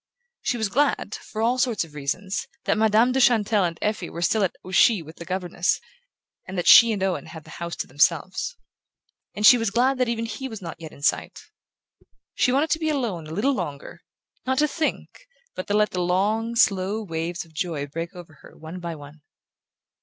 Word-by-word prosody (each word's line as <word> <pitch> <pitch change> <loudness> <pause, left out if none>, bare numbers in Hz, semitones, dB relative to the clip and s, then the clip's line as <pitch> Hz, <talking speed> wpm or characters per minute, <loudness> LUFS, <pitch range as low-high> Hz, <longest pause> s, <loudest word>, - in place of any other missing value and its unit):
She 245 - -1
was 220 -2 0
glad, 280 +8 0
for 220 0 -5
all 245 +3 +2
sorts 240 -6 +1
of 160 -2 -13
reasons, 170 +7 -3 0.2
that - - +1
Madame 220 +3 +4
de 265 - +1
Chantelle 215 -5 +3
and 165 -1 -3
Effie 210 -4 -1
were 170 - -5
still 215 +3 +2
at 185 - -1
Ouchy 185 +1 +4
with 160 +2 -13
the 170 - -9
governess, 180 -1 -1 0.7
and 190 0 -6
that 175 - -1
she 230 0 +9
and 200 -3 -2
Owen 190 -2 -1
had 160 -1 -10
the - - -14
house 170 0 -4
to - - -4
themselves. 170 - 0 0.8
And 210 - 0
she 245 +3 +9
was 225 -2 0
glad 255 +5 +2
that 250 -2 +2
even 230 -1 -2
he 230 +4 -5
was 220 -3 -7
not 165 -3 -8
yet 160 - -8
in 140 - -15
sight. - - 0 0.9
She 250 - +2
wanted 290 +4 +1
to 315 - +2
be 315 -1 -1
alone 225 - -2
a - - -9
little 220 +12 +1
longer; 145 - -6 0.4
not 260 0 -1
to 300 - +4
think, 320 - -4 0.3
but 185 - -6
to 205 - 0
let 210 0 +3
the 180 - -2
long 210 +6 0
slow 200 -1 +2
waves 165 -1 -4
of 160 - -22
joy 155 -3 -3
break 165 +5 -6
over 165 -4 -12
her - - -16
one 160 +3 -8
by 170 -2 -5
one. 145 +1 -13
195 Hz, 205 wpm, -24 LUFS, 170-230 Hz, 0.9 s, she